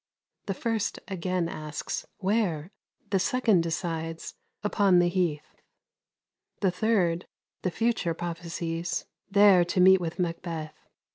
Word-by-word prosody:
The 195 - -1
first 225 +1 -1
again 185 -2 -1
asks, 155 -2 -5
'Where?' 190 -5 0 0.4
The 195 - +3
second 220 -2 +3
decides: 165 0 -3 0.3
'Upon 200 -3 +3
the 175 0 +4
heath.' 175 -5 -2 1.0
The 190 -3 +3
third, 180 -3 +1 0.3
the 185 - 0
future 215 -4 0
prophesies: 170 0 -3 0.2
'There 200 -2 +6
to 175 - -1
meet 190 0 +7
with 165 -1 -4
Macbeth.'" 165 -3 -4
180 Hz, 115 wpm, -28 LUFS, 165-195 Hz, 1.0 s, meet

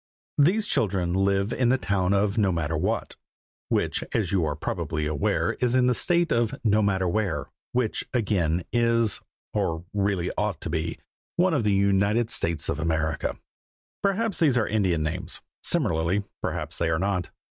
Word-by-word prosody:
These 190 +9 +4
children 95 - +1
live 100 +2 +1
in 125 -2 +2
the 130 - +4
town 95 -6 0
of 100 +1 +2
Nomatterwhat, 85 -7 0 0.5
which, - - 0
as 100 -6 0
you 95 -4 +2
are 75 - -1
probably 75 -1 -3
aware, 75 -2 0
is 125 0 +2
in 130 -1 +4
the 125 - +4
State 170 +6 +2
of 115 -1 +1
Nomatterwhere, 100 -6 +1 0.2
which 125 -3 0
again 90 -8 +1
is, 115 -2 +2 0.3
or 80 +1 -1
really 100 -3 0
ought 105 -1 -1
to 80 - -4
be, 80 0 -2 0.4
one 180 0 +3
of 140 -7 +1
the 105 - +2
United 100 +4 +2
States 85 -3 0
of 70 - -2
America. 80 -1 -1 0.7
Perhaps 200 +1 +1
these 145 -7 +4
are 110 - +2
Indian 95 -7 +1
names; 90 +4 -3 0.2
similarly, 85 +5 +1 0.2
perhaps - - -3
they 85 - +1
are 80 - +1
not. 95 -1 -1
100 Hz, 155 wpm, -26 LUFS, 85-115 Hz, 0.7 s, These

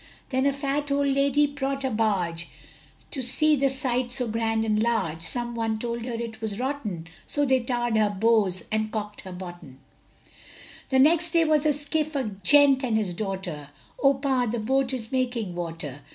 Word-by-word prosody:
Then 260 +1 +2
a - - +3
fat 280 +1 -2
old 280 0 +2
lady 275 +1 +3
bought 275 -1 -3
a 265 - -1
barge 185 -7 -1 0.6
To 275 - -2
see 305 +5 +4
the 275 -1 +2
sight 255 -2 -1
so 250 -1 0
grand 225 0 0
and 215 -1 +1
large, 220 -9 0
Some 240 +7 -1
one 225 -1 -1
told 235 +1 -4
her 250 - -4
it 230 -1 -5
was 215 -3 -2
rotten, 240 - -3 0.2
So 290 0 0
they 260 -1 +3
tarr'd 240 -1 -1
her 215 -1 +3
bows 205 -3 +2
and 215 0 -1
cork'd 210 -1 -5
her 190 - -9
bottom. 175 -7 -9 1.1
The 265 - +2
next 330 +5 +4
was 310 -1 +2
a - - +4
skiff, 300 +2 -2
a 275 - +1 0.2
gent 275 +5 +6
and 230 -4 +1
his 200 -5 -1
daughter 180 -7 -5 0.3
Oh 275 0 +5
Pa' 265 -2 0
the 230 +2 -2
boat 260 +4 +1
is 240 -4 -4
making 245 -7 -1
water! 165 -5 -5
240 Hz, 180 wpm, -25 LUFS, 210-275 Hz, 1.1 s, gent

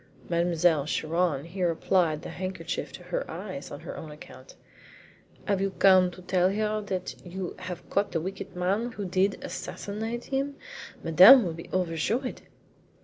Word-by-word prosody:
Mademoiselle 170 -3 +2
Chiron 160 -2 0
here 180 +1 -1
applied 165 -1 +1
the - - -6
handkerchief 185 +1 -4
to - - -10
her - - -2
eyes - - -6
on - - -8
her - - -7
own 160 - -8
account. 150 - -13 0.9
"Have 200 -3 +1
you 195 - +1
come 185 -2 +6
to 180 +1 -13
tell 180 0 +2
her 215 +1 -1
that 185 -2 -3
you 180 0 -5
have 180 -2 -7
caught 200 +1 +1
the 165 - 0
wicked 190 +2 -6
man 200 +7 0
who 205 - -5
did 190 +2 +1
assassinate 225 +4 -5
him? 275 +1 -2 0.5
Madame 190 - +9
will 170 - -2
be 165 +1 -10
overjoyed!" 185 - -1
185 Hz, 155 wpm, -27 LUFS, 170-205 Hz, 0.9 s, Madame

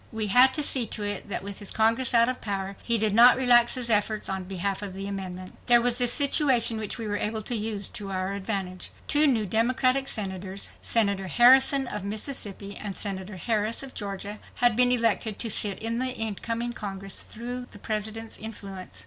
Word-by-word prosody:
We 220 -1 -2
had 250 +5 +7
to 300 - 0
see 255 -5 +2
to 210 - -3
it 205 0 -4
that, 200 - -3
with 200 0 -7
his 205 - -8
Congress 230 +3 +1
out 230 0 +5
of 255 0 -3
,power, 195 -2 -4
he 235 -1 +2
did 215 -1 0
not 240 +3 +7
relax 240 -2 +5
his 245 -2 -1
efforts 215 0 +2
on 190 -1 -4
behalf 195 +1 -3
of 195 -2 -7
the 195 +1 -6
amendment. 185 -2 -7
There 240 -1 +7
was 245 +1 0
this 245 -1 +4
situation 260 -5 +3
which 215 +1 -4
we 230 - -6
were 205 -1 -2
able 215 +1 -3
to 240 - -1
use 210 -2 0
to 200 -2 -5
our 185 0 -3
advantage. 195 -2 -4 0.2
Two 300 0 +3
new 230 -6 +1
Democratic 255 +6 +1
Senators, 190 -3 -3
Senator 200 -4 +2
Harrison 265 +5 +5
of 210 -5 -6
Mississippi 205 -2 -2
and 200 -3 -6
Senator 195 -1 -4
Harris 220 +5 -1
of 270 - -9
Georgia, 205 0 -6 0.2
had 240 -2 +2
been 250 +1 +3
elected 230 -3 +1
to 230 - -2
sit 200 -1 +2
in 230 +1 -2
the 260 - +1
incoming 230 +1 -3
Congress 195 -3 -6
through 245 +2 -7
the - - -14
President's 220 +2 -5
influence. 195 - -9
220 Hz, 200 wpm, -26 LUFS, 200-240 Hz, 0.2 s, had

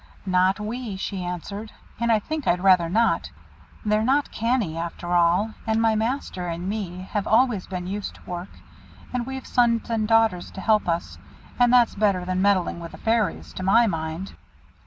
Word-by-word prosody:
"Not 185 +1 +2
we," 220 0 -4
she 190 -1 -4
answered; 200 +5 -5 0.3
"and 235 0 +1
I 220 - +5
think 300 +6 -4
I'd 180 +1 +2
rather 180 -3 +5
not. 225 +5 +2 0.6
They're 210 0 +2
not 270 +5 +1
canny 230 -7 0
after 170 +1 -4
all; 175 +5 +3
and 220 0 +2
my 225 -1 +3
master 220 -5 -2
and 170 +2 -4
me 190 -3 -4
have 205 -2 -1
always 225 -3 +3
been 180 -1 -5
used 200 +2 -4
to - - -18
work, 175 +1 -5 0.6
and 245 -1 -2
we've 265 -1 -6
sons 235 -1 +1
and 220 -2 0
daughters 225 -5 +2
to 190 - -7
help 215 -4 +2
us, 170 0 -2 0.4
and 245 -1 +5
that's 245 -2 +5
better 195 -3 +1
than 185 0 -1
meddling 190 -4 +2
with 170 -1 -8
the - - -9
Fairies, 225 -2 -1
to - - -6
my 210 +6 +5
mind. 165 -1 -3
205 Hz, 180 wpm, -24 LUFS, 180-230 Hz, 0.6 s, I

